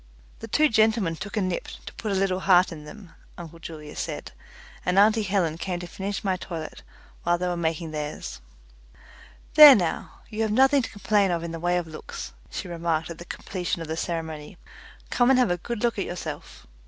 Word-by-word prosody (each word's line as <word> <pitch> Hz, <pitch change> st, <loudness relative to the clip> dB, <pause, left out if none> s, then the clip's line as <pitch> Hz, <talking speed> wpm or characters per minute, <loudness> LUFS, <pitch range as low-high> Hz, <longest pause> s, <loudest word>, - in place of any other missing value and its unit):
The 225 Hz, -, -7 dB
two 305 Hz, +8 st, +4 dB
gentlemen 220 Hz, -, +2 dB
took 200 Hz, +6 st, -6 dB
a 205 Hz, -, +2 dB
nip, 185 Hz, -1 st, -2 dB, 0.2 s
to -, -, -8 dB
put 215 Hz, -, -4 dB
a -, -, +1 dB
little 190 Hz, -1 st, +1 dB
heart 185 Hz, -1 st, +4 dB
in 150 Hz, -2 st, -9 dB
them 180 Hz, +3 st, -12 dB, 0.3 s
uncle 165 Hz, -1 st, -10 dB
Julius 155 Hz, -2 st, -8 dB
said, -, -, -5 dB, 0.5 s
and 180 Hz, +1 st, 0 dB
auntie 215 Hz, +2 st, +5 dB
Helen 185 Hz, -6 st, 0 dB
came 180 Hz, -1 st, -3 dB
to 175 Hz, -, -6 dB
finish 195 Hz, +3 st, -4 dB
my 190 Hz, -2 st, 0 dB
toilet 165 Hz, -4 st, -7 dB, 0.4 s
while 175 Hz, 0 st, +2 dB
they 180 Hz, +1 st, -2 dB
were 175 Hz, -, -1 dB
making 165 Hz, -1 st, -2 dB
theirs. 150 Hz, -, -5 dB, 1.1 s
"There 300 Hz, -3 st, +11 dB
now, 175 Hz, -5 st, -2 dB
you 220 Hz, -1 st, -4 dB
have 220 Hz, -1 st, +1 dB
nothing 270 Hz, +4 st, +5 dB
to -, -, -5 dB
complain 205 Hz, -1 st, +1 dB
of 170 Hz, -1 st, -1 dB
in 170 Hz, -, -4 dB
the 165 Hz, -, -5 dB
way 175 Hz, +1 st, +1 dB
of 175 Hz, -, -2 dB
looks," 155 Hz, -1 st, -8 dB, 0.2 s
she -, -, -5 dB
remarked 170 Hz, -1 st, -2 dB
at 165 Hz, -, -9 dB
the 170 Hz, -, -9 dB
completion 180 Hz, -2 st, -4 dB
of -, -, -8 dB
the 160 Hz, -, -3 dB
ceremony. 160 Hz, 0 st, -4 dB, 0.5 s
"Come 245 Hz, 0 st, +3 dB
and 265 Hz, -, +6 dB
have 250 Hz, -7 st, +3 dB
a 175 Hz, -, +1 dB
good 235 Hz, +5 st, -5 dB
look 235 Hz, -3 st, +1 dB
at -, -, -1 dB
yourself." 175 Hz, -, -7 dB
180 Hz, 205 wpm, -25 LUFS, 165-210 Hz, 1.1 s, There